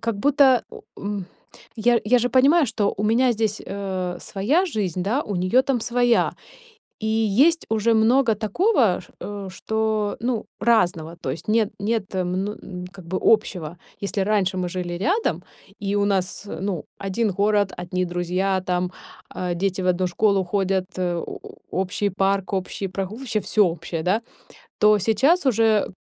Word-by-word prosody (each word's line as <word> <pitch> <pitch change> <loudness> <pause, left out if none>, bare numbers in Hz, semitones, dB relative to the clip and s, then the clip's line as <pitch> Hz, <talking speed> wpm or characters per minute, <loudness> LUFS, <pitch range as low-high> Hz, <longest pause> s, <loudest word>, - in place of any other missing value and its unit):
как 230 -2 -2
будто, 275 -1 +4
э, - - -12 0.2
у - - -11
м, 200 -2 -4 0.5
я 235 +1 +3
я 245 +3 +4
же 245 +1 0
понимаю, 280 +6 +5
что 210 -3 0
у 210 - -2
меня 245 +4 +3
здесь, 215 -2 -1
э, 185 -3 -4
своя 260 - +1
жизнь, 190 - -2
да, 235 +10 0
у 205 -8 -4
неё 185 +9 +3
там 260 -4 0
своя. 245 0 +2 0.7
И 220 - -3
есть 225 +10 +3
уже 225 +1 +2
много 230 +2 +4
такого, 225 - +2
ш - - -17
э, 200 -2 -6
что 220 +1 -1
ну, 235 -2 -2
разного, 175 -8 +1
то 130 - -3
есть 150 - -6
нет 220 -1 +2
нет 210 -1 -2
мн 185 +2 -1
м, 180 -1 -7
как 185 -4 -13
бы 185 +2 -2
общего. 180 -7 +1 0.2
Если 200 0 -1
раньше 195 -2 +1
мы 180 -1 -1
жили 175 -1 -4
рядом 365 - 0 0.3
и 200 0 -2
у 205 0 +2
нас, 195 -2 -1
э, 160 - -6
ну, 190 -5 -3
один 200 +3 -1
город, 205 +1 +1
одни 180 +1 -2
друзья 180 +2 -1
там, 180 -1 -1 0.4
э, 180 -1 -2
дети 190 +1 -1
в 185 - -2
одну 180 0 +1
школу 200 +1 +2
ходят, 190 0 0
э, 175 -1 0
о 170 - -5
о - - -12 0.3
общий 200 +2 -1
парк, 195 +1 0
общий 190 +1 -3
прогу 190 +2 -4
вообще 240 -4 -2
всё 210 0 +3
общее, 165 -1 -4
да? 200 +7 +1 0.6
То 210 0 +5
сейчас 270 - +2
уже, 225 -3 +3
200 Hz, 175 wpm, -23 LUFS, 185-225 Hz, 0.7 s, понимаю